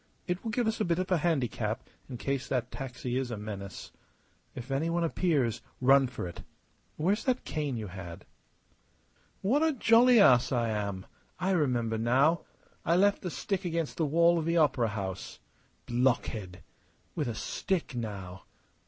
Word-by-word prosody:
It 180 0 -3
will 225 - -3
give 240 +2 0
us 220 0 -1
a - - +4
bit 170 -3 +1
of 185 +1 -2
a 180 - +3
handicap 125 -9 -1 0.2
in 125 - -6
case 135 +1 -2
that 125 -2 -1
taxi 125 -1 -4
is 130 -1 -1
a 115 - -4
menace. 100 -2 -7 0.6
If 125 +2 -7
any 145 +5 0
one 170 0 0
appears, 150 -9 +1 0.2
run 135 +1 +5
for 125 -7 -5
it. 85 - -9 0.5
Where's 195 +8 +1
the 255 - +2
cane 150 - -3
you 110 - -4
had?" 90 -3 -9 1.2
"What 255 +10 +3
a 320 -1 +3
jolly 240 0 +6
ass 130 -9 +6
I 120 -3 +1
am! 100 -3 -3 0.3
I 185 +2 0
remember 120 -10 +1
now. 135 +8 +3 0.4
I 170 - +2
left 200 +2 +3
the 180 - -3
stick 195 +3 -3
against 165 -3 -2
the 160 - +1
wall 170 +3 +4
of 160 - -3
the 170 +1 +1
opera 130 -7 +3
house. 100 -7 -5 0.5
Blockhead! 120 -6 -1 0.5
With 150 -5 -2
a 115 - -3
stick, 185 - -2
now!... 100 -6 -6
135 Hz, 170 wpm, -30 LUFS, 115-175 Hz, 1.2 s, jolly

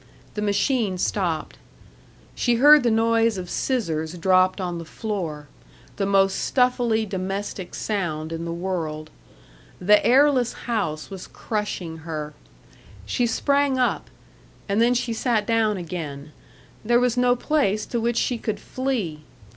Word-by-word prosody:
The 210 - -4
machine 210 -1 +1
stopped. 175 -4 -2 0.7
She 240 -1 +1
heard 295 +5 +7
the 245 - +2
noise 225 -1 +2
of 180 -1 -6
scissors 165 - -2
dropped 185 +2 +3
on 175 -2 -3
the - - -6
floor 165 -6 -5 0.5
the 195 - 0
most 195 -1 +3
stuffily 245 -3 +1
domestic 195 -1 -4
sound 165 -7 -3
in 165 0 -4
the 170 - -4
world. 170 -3 -4 0.7
The 205 +3 +4
airless 260 -1 +4
house 160 -11 -2
was 190 -2 -8
crushing 205 -7 -4
her. 155 -2 -6 0.7
She 245 -2 0
sprang 280 +2 +1
up 250 -1 0 0.6
and 200 +2 +1
then 240 +1 +4
she 240 -1 -1
sat 225 -2 0
down 220 -2 +1
again. 155 -4 -6 0.5
There 240 +2 +3
was 250 -1 +1
no 245 0 +3
place 245 -7 0
to 235 - -2
which 235 +1 0
she 245 -2 0
could 215 - -3
flee. 240 - -3
210 Hz, 140 wpm, -23 LUFS, 175-240 Hz, 0.7 s, heard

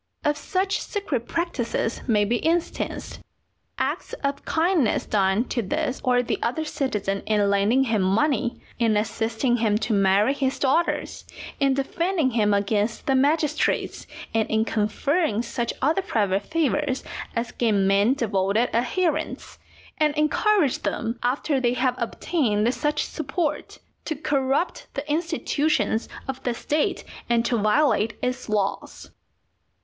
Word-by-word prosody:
Of 295 0 +2
such 375 +6 -1
secret 290 - -3
practices 280 -9 -2
may 210 -4 +3
be 235 +3 -1
instanced, 335 +1 -1 0.6
acts - - -2
of 280 0 -1
kindness 325 - +1
done 195 +1 +2
to 240 - 0
this 240 +5 -2
or 250 -1 +3
the - - -2
other 315 +7 -1
citizen 210 -10 -2
in 205 -2 +2
lending 205 +7 +3
him 225 -5 +1
money, 240 +6 +1 0.2
in 225 -3 +3
assisting 225 +3 0
him 220 -3 +2
to 225 - -1
marry 200 +5 +3
his 270 -2 -1
daughters, 290 +6 0 0.4
in 275 -2 +3
defending 320 +2 0
him 215 -3 +2
against 205 +2 0
the 270 - +2
magistrates, 300 +3 +1 0.3
and 225 -1 +1
in 220 0 +2
conferring 225 - 0
such 235 0 -2
other 315 +7 +3
private 200 - 0
favours 300 -4 0 0.3
as 235 +1 -2
gain 210 -5 +1
men 200 +6 +3
devoted 215 -1 +1
adherents, 320 +9 -1 0.4
and 300 -1 +2
encourage 305 - +2
them 230 +1 -3
after 270 +3 0
they 245 -1 +1
have 255 0 +1
obtained 235 -3 0
such 295 +4 0
support, 310 -5 -3 0.3
to 315 - -2
corrupt 280 +2 -1
the 280 +2 -4
institutions 310 -5 0 0.2
of 265 0 -4
the 245 -3 -1
State 300 +5 -1 0.3
and 235 0 +2
to 240 - +1
violate 215 0 +2
its 250 -1 -2
laws. 205 -2 -2
250 Hz, 135 wpm, -24 LUFS, 220-295 Hz, 0.6 s, may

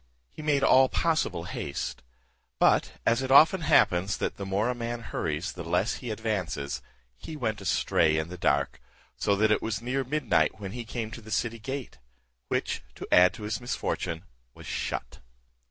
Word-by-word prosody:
He - - -10
made 145 -2 +1
all 130 -1 +6
possible 155 - 0
haste; 70 -6 -4 0.6
but, - - +3
as 115 +2 +3
it 130 - -3
often 160 +7 +7
happens 95 - +3
that - - -2
the 100 - -5
more 100 +4 +1
a - - +1
man 120 0 -4
hurries 80 -4 -3
the 90 - -7
less 90 +6 0
he 125 - -7
advances, 90 - -2 0.4
he 155 - -7
went 110 -6 -2
astray 80 -4 +2
in 80 0 -1
the 90 - -6
dark, 70 -6 0 0.3
so 100 - +1
that 105 +2 +3
it 105 - +3
was 110 -2 -2
near 130 +3 -1
midnight 130 -4 +1
when 100 -2 -6
he 120 +2 -6
came 115 -1 -4
to 115 - -8
the 110 - -13
city 115 +2 -1
gate; 130 +4 -6 0.5
which, - - -1
to - - -8
add 90 0 +7
to 105 - -9
his 105 +1 -3
misfortune, 85 -8 -3 0.3
was - - -12
shut. - - -4
110 Hz, 180 wpm, -28 LUFS, 90-125 Hz, 0.6 s, often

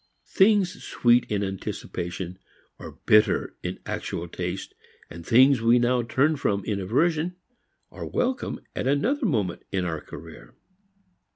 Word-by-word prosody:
Things 195 -1 +3
sweet 120 0 +2
in 100 -1 0
anticipation 90 -1 -5 0.4
are - - -9
bitter 105 -1 +3
in - - -4
actual 85 - -4
taste, 90 +2 -5 0.5
things 125 - +5
we 115 +1 +5
now 120 +1 +2
turn 140 +6 +1
from 100 -7 -1
in 105 -2 -1
aversion 160 - +1 0.6
are - - -7
welcome 250 0 -1 0.2
at - - -2
another 230 - +1
moment 105 - -1
in 95 -2 -1
our 80 -3 -3
career. - - -12
120 Hz, 125 wpm, -25 LUFS, 95-155 Hz, 0.6 s, things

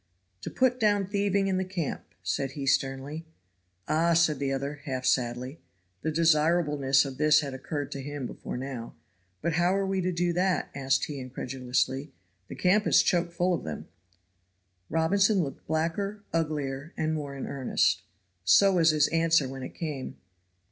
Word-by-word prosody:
"To - - -5
put 255 -1 +1
down 205 -3 +3
thieving 200 0 +1
in 190 -1 +1
the 190 - 0
camp," 180 -5 -3 0.2
said 135 +9 -2
he, 140 -1 -5
sternly. 135 +3 0 0.6
"Ah!" 165 +2 +2
said 160 -4 +3
the 140 -1 -1
other, 140 +2 -3
half 130 -3 -3
sadly 125 +3 0 0.4
(the 160 - -1
desirableness 150 -3 +3
of 135 -1 -7
this 155 0 +5
had 140 -3 -5
occurred 145 +2 -4
to 140 - -5
him 145 -1 -5
before 120 - -6
now); 125 -3 -6 0.5
"but 170 +1 0
how 175 +3 +2
are 195 - 0
we 190 0 0
to 185 +1 0
do 175 0 0
that?" 180 +1 0
asked 135 -1 +1
he, 145 -2 -6
incredulously. 130 +2 -2 0.4
"The - - -8
camp 205 +3 +2
is - - +5
choke 175 -2 +1
full 175 +1 +1
of 170 - -2
them." 80 - -6 1.0
Robinson 195 +5 +3
looked 135 -3 -7
blacker, 170 +6 -1
uglier 150 -2 -2
and 155 0 0
more 145 -3 -4
in 135 - -5
earnest. 135 -2 +1 0.4
So 195 - +6
was 165 -1 +5
his 155 -2 +4
answer 165 -3 +3
when 135 0 -7
it - - -7
came. 150 -6 -5
155 Hz, 170 wpm, -28 LUFS, 135-175 Hz, 1.0 s, So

